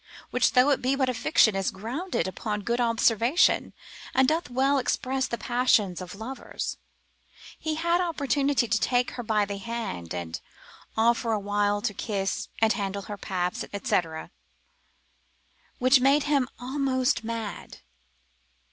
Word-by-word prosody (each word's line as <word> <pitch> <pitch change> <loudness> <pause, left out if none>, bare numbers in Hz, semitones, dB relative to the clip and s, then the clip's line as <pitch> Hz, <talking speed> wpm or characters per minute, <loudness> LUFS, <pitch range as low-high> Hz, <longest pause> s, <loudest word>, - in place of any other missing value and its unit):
(which, - - +2
though 255 +3 +5
it 275 - +1
be 260 +2 +1
but 265 -2 +1
a - - 0
fiction, 225 -3 +3
is 195 -1 0
grounded 245 - -3
upon 210 +2 -3
good 235 +3 0
observation, 230 - +3 0.4
and 265 0 +5
doth 320 -1 0
well 270 +3 +2
express 260 +1 -1
the 235 - -3
passions 230 -8 +2
of 180 +1 -8
lovers), 235 +6 -5 0.8
he 315 -1 -2
had 340 +2 +1
opportunity 285 -6 +1
to 220 -1 +1
take 245 -1 +1
her 245 - -5
by 215 -2 +1
the 200 0 -5
hand, 200 - -5
and 85 -2 -4 0.6
after 230 +1 +2
a 215 - +1
while 205 0 0
to 215 - 0
kiss, 195 -1 -2
and 220 - +5
handle 200 -1 -3
her 205 - -6
paps, 180 -2 -2 0.2
&c., - - +3 1.8
which 255 +2 +5
made 275 +3 +4
him 285 -4 +2
almost 260 -1 0
mad. 225 -3 -6
235 Hz, 145 wpm, -27 LUFS, 205-265 Hz, 1.8 s, though